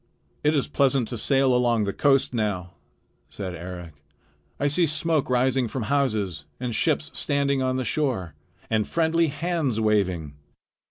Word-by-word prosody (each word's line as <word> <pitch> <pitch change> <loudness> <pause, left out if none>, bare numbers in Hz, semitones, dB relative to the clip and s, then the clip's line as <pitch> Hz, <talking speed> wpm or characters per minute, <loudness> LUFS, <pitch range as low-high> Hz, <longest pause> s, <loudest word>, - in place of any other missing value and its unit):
"It 150 +1 +3
is 140 - +1
pleasant 135 -4 +2
to 125 - -4
sail 135 +2 +3
along 120 -3 +2
the 100 -1 -2
coast 135 -3 +3
now," 100 -6 -2 0.6
said 95 -3 -5
Eric. 90 -1 -8 0.7
"I 145 - 0
see 160 +4 +3
smoke 155 -1 0
rising 125 0 +2
from 125 +1 -4
houses 110 - 0 0.2
and 125 -2 -3
ships 155 +5 0
standing 140 -2 0
on 130 0 0
the 130 - -1
shore 115 - -1 0.3
and 110 -1 0
friendly 165 0 +2
hands 145 -5 -1
waving." 95 -9 +1
130 Hz, 150 wpm, -25 LUFS, 105-145 Hz, 0.7 s, It